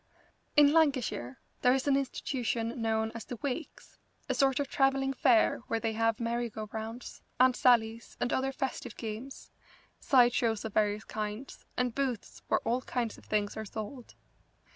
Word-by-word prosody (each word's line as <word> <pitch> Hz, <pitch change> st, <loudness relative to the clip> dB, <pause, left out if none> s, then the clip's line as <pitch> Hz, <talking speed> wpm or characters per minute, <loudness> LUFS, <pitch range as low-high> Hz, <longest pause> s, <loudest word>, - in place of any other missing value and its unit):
In 295 Hz, 0 st, +7 dB
Lancashire 265 Hz, -, +1 dB, 0.2 s
there 250 Hz, +1 st, +5 dB
is 270 Hz, +1 st, -2 dB
an 280 Hz, -, +4 dB
institution 245 Hz, -3 st, -2 dB
known 220 Hz, 0 st, 0 dB
as 230 Hz, -, -6 dB
the 245 Hz, -, -7 dB
Wakes, 285 Hz, +2 st, -5 dB, 0.3 s
a -, -, 0 dB
sort 270 Hz, -1 st, +2 dB
of 285 Hz, -, 0 dB
travelling 270 Hz, 0 st, +2 dB
fair 245 Hz, -3 st, +4 dB
where 225 Hz, -, 0 dB
they 225 Hz, -1 st, -1 dB
have 225 Hz, 0 st, +1 dB
merry 235 Hz, 0 st, -1 dB
go 215 Hz, 0 st, -6 dB
rounds, 225 Hz, +2 st, -6 dB, 0.2 s
Aunt 255 Hz, 0 st, +5 dB
Sallies, 230 Hz, -3 st, +2 dB
and 245 Hz, -, 0 dB
other 265 Hz, +1 st, +1 dB
festive 265 Hz, -3 st, -4 dB
games, 230 Hz, +4 st, -7 dB, 0.5 s
side 245 Hz, -3 st, +5 dB
shows 225 Hz, -3 st, 0 dB
of 220 Hz, -, -5 dB
various 210 Hz, 0 st, +1 dB
kinds, 215 Hz, +4 st, -6 dB
and 250 Hz, -1 st, +1 dB
booths 255 Hz, -4 st, -3 dB
where -, -, +2 dB
all 240 Hz, +3 st, 0 dB
kinds 240 Hz, -3 st, -3 dB
of -, -, -19 dB
things 210 Hz, -1 st, -1 dB
are 220 Hz, -, -4 dB
sold. 220 Hz, +4 st, -7 dB
240 Hz, 165 wpm, -31 LUFS, 220-265 Hz, 0.5 s, In